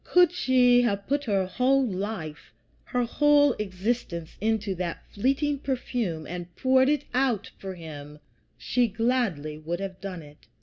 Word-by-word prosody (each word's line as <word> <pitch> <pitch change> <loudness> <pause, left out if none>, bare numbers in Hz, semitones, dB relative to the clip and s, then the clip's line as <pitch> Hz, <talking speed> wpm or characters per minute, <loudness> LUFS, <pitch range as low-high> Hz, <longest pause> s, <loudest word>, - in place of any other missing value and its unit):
Could 355 -2 +5
she 250 -7 +4
have 200 -4 0
put 285 +2 -1
her 195 -4 +1
whole 260 +7 +2
life, 190 -7 -5 0.3
her 245 0 0
whole 290 +3 +4
existence, 190 -4 -3
into 215 -2 0
that 175 -2 -4
fleeting 275 +6 0
perfume 240 - -2
and 175 +1 -7
poured 260 +1 +4
it 295 -1 +1
out 250 -5 0
for 190 -1 -6
him, 150 -3 -9 0.4
she 245 -1 +1
gladly 210 - -1
would 170 +3 -4
have 190 -2 -6
done 185 -4 -6
it. 145 -4 -17
215 Hz, 145 wpm, -26 LUFS, 180-260 Hz, 0.4 s, Could